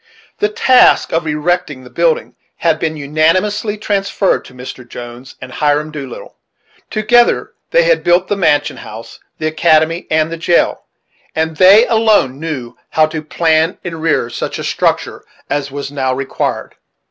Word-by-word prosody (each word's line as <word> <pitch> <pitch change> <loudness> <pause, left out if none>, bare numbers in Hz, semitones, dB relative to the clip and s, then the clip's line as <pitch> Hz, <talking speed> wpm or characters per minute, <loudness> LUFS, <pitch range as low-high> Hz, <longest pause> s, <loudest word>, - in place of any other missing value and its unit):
The 420 - +1
task 410 - +4
of 165 0 0
erecting 150 -2 -1
the 125 - -14
building 485 -1 0 0.2
had 165 -2 0
been 160 -1 -2
unanimously 185 +9 0
transferred 200 -1 0
to - - -14
Mr. 125 0 -9
Jones 120 +2 -10
and 125 - -9
Hiram 150 +2 0
Doolittle. 140 -5 -9 0.5
Together 235 +3 +2 0.2
they - - +4
had - - +2
built 175 +2 +3
the 205 - 0
mansion 145 -7 +1
house, 110 +2 -10 0.2
the 155 - -4
academy, 160 +1 +2
and 155 +1 +1
the 165 - -4
jail, 170 +1 +1 0.5
and 160 0 -1
they 195 +6 +7
alone 220 - +2
knew 145 -7 -5
how 155 0 +3
to 155 0 -5
plan 160 +1 +1
and 165 -3 -6
rear 160 -7 +1
such - - -4
a - - -5
structure - - -1 0.3
as 145 -1 -1
was 140 0 -6
now 130 -2 -1
required. 135 0 -3
160 Hz, 155 wpm, -15 LUFS, 145-195 Hz, 0.5 s, they